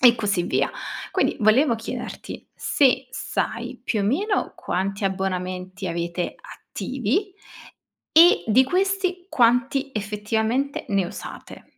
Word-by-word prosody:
e 240 -1 +8
così 200 -5 0
via. - - +1 0.4
Quindi - - +1
volevo 235 +4 +4
chiederti 225 0 -7
se 260 -2 +2
sai 245 0 -3
più 220 -4 -1
o - - 0
meno 390 - 0
quanti 195 +2 -2
abbonamenti 185 0 -3
avete 170 +1 -3
attivi, 395 -1 -3 0.8
e 340 +3 +7
di 235 +4 +5
questi 370 +2 0
quanti 260 +2 +2
effettivamente 220 +6 -1
ne 195 -3 +1
usate? 200 - -9
230 Hz, 110 wpm, -24 LUFS, 195-275 Hz, 0.8 s, e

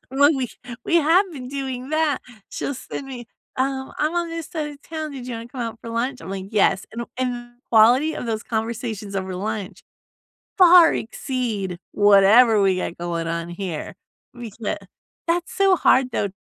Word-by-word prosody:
Well, 285 +2 +5
we 255 -3 -2 0.4
we 340 - +2
have 340 +5 +4
been 255 -4 -7
doing 265 -2 -4
that 310 -3 +1 0.3
she'll 280 - -3
send 270 +2 -7
me 245 -3 -8 0.3
"Um, 265 0 -2
I'm 310 +3 0
on 345 -1 0
this 330 -2 -5
side 310 -3 -3
of 285 0 -14
town, 315 -2 -5
did 255 -2 -7
you 245 - -4
wanna 230 +1 -7
come 250 0 -8
out 230 -1 -4
for 230 - -8
lunch?" 250 +3 -2
I'm, - - -8
like, 195 -1 -5
"Yes." 200 -2 +2
And 235 - -4
the - - -8
and 250 -1 0
the 240 0 -10 0.2
quality 245 +8 +5
of - - -5
those 220 -1 -2
conversations 220 -2 -4
over 190 -1 -3
lunch, 200 -1 -4 0.8
far 355 -2 +8
exceed 220 -6 -3
whatever 205 +2 +6
we 190 -2 +3
got 180 - -4
going 170 -1 -3
on 170 +1 -3
here. 175 -3 -5 0.4
We 240 -2 -8
ca 215 0 -4 0.5
that's 345 +1 0
so 390 -4 +4
hard, 260 -6 +3
though, 200 - -1
240 Hz, 185 wpm, -22 LUFS, 205-280 Hz, 0.8 s, far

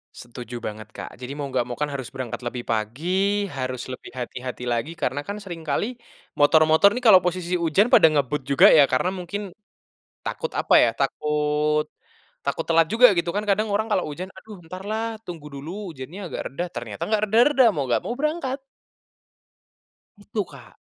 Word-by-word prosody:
Setuju 120 0 -9
banget, 110 0 -6
Kak. - - -6
Jadi 125 +2 -6
mau 145 - -3
nggak 125 -2 +1
mau 120 - -5
kan - - +3
harus 130 -3 -5
berangkat 130 -2 -5
lebih 120 0 -4
pagi, 115 +8 -2 0.5
harus 130 -1 -3
lebih - - -10
hati-hati 125 0 -6
lagi 120 +8 -2
karena 130 +3 -1
kan 205 +1 -4
sering 175 -4 -7
kali 140 - +1 0.5
motor-motor 155 +5 +6
nih 250 - -4
kalo 200 -4 +9
posisi 180 0 -2
hujan 180 +8 +3
pada 160 - +8
ngebut 145 0 0
juga 140 - +6
ya 145 - +8
karena 130 +8 +2
mungkin 200 +4 -5 0.8
takut, 485 - -3
apa - - +1
ya, - - +4
takut 150 0 +1 0.6
takut 140 +4 -2
telat 165 -1 +4
juga 250 +2 +8
gitu 170 0 0
kan. 210 - 0
Kadang 215 +2 +2
orang 220 +2 +1
kalau 185 - +2
hujan, 180 +6 -6
"Aduh, 210 +2 -11
entarlah 195 +6 -4 0.2
tunggu 165 -4 -8
dulu 145 +5 -7 0.2
hujannya 150 +7 -9
agak - - -5
reda." 155 +6 -4
Ternyata 110 -4 -6
nggak 215 -1 +1
reda-reda, 250 +6 +5
mau 145 - 0
nggak 120 - +1
mau 240 - -3
berangkat. 300 -3 -1 1.6
Itu, 205 -1 -4
Kak. 135 -4 -15
155 Hz, 170 wpm, -24 LUFS, 130-200 Hz, 1.6 s, kalo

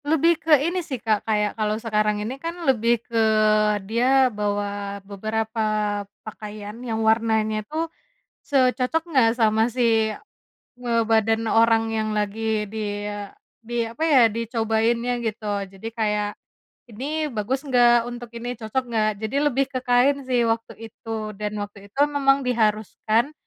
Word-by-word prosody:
Lebih 320 +2 +2
ke 315 -2 +5
ini 360 +2 0
sih 280 -6 -5
Kak, 220 -1 -1
kayak 210 -1 +1
kalau 215 -1 -1
sekarang 215 -2 0
ini 260 +5 -6
kan 335 +1 -5
lebih 235 -3 +2
ke 230 - -4 0.7
dia 255 +4 +4
bawa 205 -2 -3
beberapa 220 +2 -2 0.6
pakaian 210 -1 -8
yang 225 -2 -2
warnanya 220 -1 +1
tuh, 320 +7 -3 0.5
se 260 -3 +2
cocok 270 +7 -1
nggak 265 -9 +3
sama 220 0 +3
si 230 -2 +2 0.7
ngebadan 225 -2 +1
orang 225 0 +3
yang 220 -1 -1
lagi 210 0 -1
dia 205 -1 -5 0.3
di 235 -1 -2
apa 270 +8 -5
ya 290 -6 +5
dicobainnya 230 +1 0
gitu. 205 -2 -2
Jadi 195 +3 -10
kayak, 210 -2 -1 0.6
"Ini 295 +5 -3
bagus 230 +5 -2
gak 240 -3 +4
untuk 240 -1 -8
ini, 245 +1 -4
cocok 235 +2 -3
nggak?" 220 -2 +1 0.2
Jadi 220 - -4
lebih 275 +1 +1
ke 255 - -1
kain 250 +3 +3
sih 245 -2 +2
waktu 230 0 -1 0.2
itu. 220 -2 -5
Dan 210 0 -3
waktu 200 0 -12
itu 240 - -10
memang 280 -1 +2
diharuskan 220 +2 +1
225 Hz, 140 wpm, -23 LUFS, 215-250 Hz, 0.7 s, ke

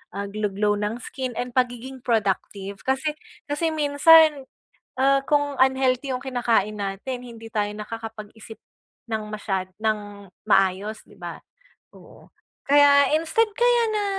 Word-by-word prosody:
ah, 200 - -3
glow 210 +1 -2
glow 205 +1 +1
ng 215 +3 -3
skin 260 -2 -5
and 245 0 -4
pagiging 250 +1 -1
productive. 200 -3 -1
Kasi 265 +4 0 0.4
kasi 320 +2 0
minsan, 300 -1 +5 0.5
ah, 275 +1 +4
kung 290 -1 +1
unhealthy 265 0 +2
yung 255 - -2
kinakain 235 -5 0
natin 205 +6 -5
hindi 230 -2 -11
tayo 205 -1 0
nakakapag-isip 220 0 -8 0.5
ng 220 -1 -2
masyad 195 -3 -3
nang 205 -3 -3 0.2
maayos, 195 +1 +1
'di - - -19
ba? - - -7 0.6
Oo, - - -17 0.4
kaya 285 -1 +6
instead 330 +8 +1
kaya 485 0 +4
na 415 -1 0
245 Hz, 130 wpm, -24 LUFS, 210-280 Hz, 0.6 s, kaya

